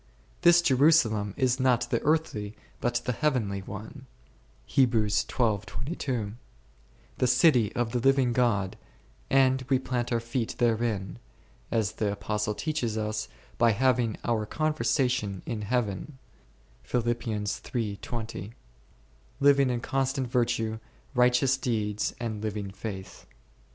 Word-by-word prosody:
This 170 Hz, 0 st, +6 dB
Jerusalem 130 Hz, -, +3 dB
is 130 Hz, -1 st, +2 dB
not 130 Hz, -2 st, +2 dB
the -, -, +1 dB
earthly 125 Hz, -10 st, 0 dB, 0.2 s
but 120 Hz, 0 st, -1 dB
the 125 Hz, -, +1 dB
heavenly 115 Hz, -8 st, 0 dB
one 110 Hz, +8 st, -9 dB, 0.6 s
1, 135 Hz, -2 st, +4 dB
the 105 Hz, -, -3 dB
city 125 Hz, -4 st, +4 dB
of 120 Hz, -2 st, 0 dB
the 125 Hz, -, 0 dB
living 135 Hz, -1 st, +3 dB
God, 105 Hz, -6 st, +1 dB, 0.5 s
and 130 Hz, -1 st, +3 dB
we 135 Hz, -, +4 dB
plant 125 Hz, -2 st, -2 dB
our 120 Hz, -, +2 dB
feet 115 Hz, 0 st, -3 dB
therein, 110 Hz, -, 0 dB, 0.5 s
as 110 Hz, -3 st, 0 dB
the 105 Hz, -2 st, -1 dB
Apostle 105 Hz, 0 st, -2 dB
teaches 125 Hz, -8 st, -2 dB
us, 110 Hz, 0 st, -2 dB, 0.3 s
by 115 Hz, -2 st, +5 dB
having 120 Hz, -1 st, +1 dB
our 110 Hz, -3 st, 0 dB
conversation 125 Hz, -10 st, 0 dB
in 110 Hz, -, -3 dB
Heaven*, 110 Hz, +2 st, -2 dB, 0.7 s
living 120 Hz, 0 st, 0 dB, 2.4 s
in 120 Hz, -1 st, -1 dB
constant 135 Hz, 0 st, -1 dB
virtue, 115 Hz, -2 st, 0 dB, 0.3 s
righteous 125 Hz, +1 st, +3 dB
deeds 105 Hz, -5 st, -1 dB
and 110 Hz, -3 st, -4 dB
living 105 Hz, -2 st, -3 dB
faith. 95 Hz, -2 st, -8 dB
120 Hz, 110 wpm, -28 LUFS, 105-130 Hz, 2.4 s, This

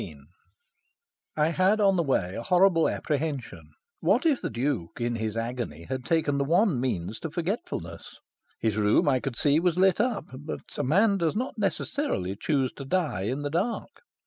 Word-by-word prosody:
XIII 75 Hz, -5 st, -9 dB, 1.2 s
I 155 Hz, +1 st, +3 dB
had 185 Hz, +5 st, +2 dB
on 195 Hz, -2 st, +4 dB
the 175 Hz, -, +2 dB
way 115 Hz, -, 0 dB
a -, -, -4 dB
horrible 180 Hz, +3 st, +4 dB
apprehension. 145 Hz, -3 st, -3 dB, 0.3 s
What -, -, +2 dB
if 295 Hz, -5 st, +3 dB
the -, -, -2 dB
Duke, 115 Hz, -, -2 dB
in 120 Hz, 0 st, -1 dB
his 110 Hz, 0 st, -3 dB
agony, 115 Hz, -9 st, -4 dB
had 130 Hz, +7 st, -4 dB
taken 155 Hz, -4 st, +1 dB
the -, -, +2 dB
one 170 Hz, -, +2 dB
means 110 Hz, -4 st, -2 dB
to 160 Hz, -, -5 dB
forgetfulness? 160 Hz, -, -4 dB, 0.4 s
His 110 Hz, -2 st, 0 dB
room, 105 Hz, +6 st, +3 dB
I 130 Hz, -2 st, +3 dB
could 135 Hz, -2 st, -4 dB
see, 145 Hz, +4 st, +3 dB
was 175 Hz, 0 st, +1 dB
lit 190 Hz, +1 st, +4 dB
up; 235 Hz, -9 st, -1 dB
but 150 Hz, +2 st, -6 dB
a -, -, -1 dB
man 195 Hz, -, +3 dB
does 165 Hz, +1 st, 0 dB
not 250 Hz, 0 st, -3 dB
necessarily 200 Hz, -, -1 dB
choose 135 Hz, +3 st, 0 dB
to 140 Hz, -, -6 dB
die 150 Hz, -, -1 dB
in 135 Hz, +5 st, -2 dB
the 145 Hz, -, -3 dB
dark. 200 Hz, +9 st, -2 dB
145 Hz, 180 wpm, -27 LUFS, 120-185 Hz, 1.2 s, on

